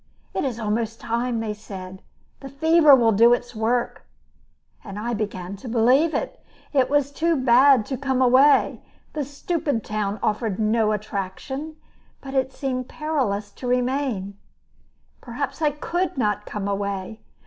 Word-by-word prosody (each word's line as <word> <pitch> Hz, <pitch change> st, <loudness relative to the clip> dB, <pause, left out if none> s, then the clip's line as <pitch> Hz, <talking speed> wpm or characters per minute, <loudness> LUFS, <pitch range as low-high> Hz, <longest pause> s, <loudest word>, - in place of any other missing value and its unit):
"It -, -, -1 dB
is 250 Hz, -4 st, -3 dB
almost 225 Hz, +1 st, -2 dB
time," 235 Hz, +1 st, -1 dB
they 215 Hz, -2 st, -3 dB
said; 190 Hz, -3 st, -9 dB, 0.4 s
"the 270 Hz, -, -9 dB
fever 310 Hz, +1 st, +6 dB
will 235 Hz, -3 st, +3 dB
do 230 Hz, +3 st, +6 dB
its 245 Hz, 0 st, -2 dB
work," 235 Hz, +3 st, -1 dB, 0.8 s
and 200 Hz, -2 st, -8 dB
I 235 Hz, +3 st, -3 dB
began 200 Hz, -3 st, -4 dB
to 240 Hz, +5 st, -9 dB
believe 255 Hz, +8 st, +3 dB
it. -, -, -4 dB, 0.3 s
It 265 Hz, -3 st, +3 dB
was 285 Hz, -1 st, +1 dB
too 330 Hz, +3 st, +1 dB
bad 260 Hz, -2 st, +5 dB
to 265 Hz, -, -4 dB
come 265 Hz, -1 st, -1 dB
away; 260 Hz, +3 st, +4 dB, 0.3 s
the 300 Hz, -, -2 dB
stupid 285 Hz, -, -2 dB
town 210 Hz, -1 st, -3 dB
offered 210 Hz, -2 st, -1 dB
no 220 Hz, 0 st, +2 dB
attraction; 215 Hz, +9 st, -4 dB, 0.4 s
but 270 Hz, -1 st, -9 dB
it 265 Hz, -1 st, +1 dB
seemed 255 Hz, -2 st, -4 dB
perilous 250 Hz, -10 st, -2 dB
to 250 Hz, -, -8 dB
remain. 250 Hz, -6 st, -1 dB, 0.8 s
Perhaps 270 Hz, +4 st, -5 dB
I 305 Hz, -, +4 dB
could 335 Hz, +4 st, -3 dB
not 210 Hz, -4 st, -1 dB
come 205 Hz, -1 st, -4 dB
away. 200 Hz, +1 st, -3 dB
240 Hz, 150 wpm, -23 LUFS, 210-275 Hz, 0.8 s, fever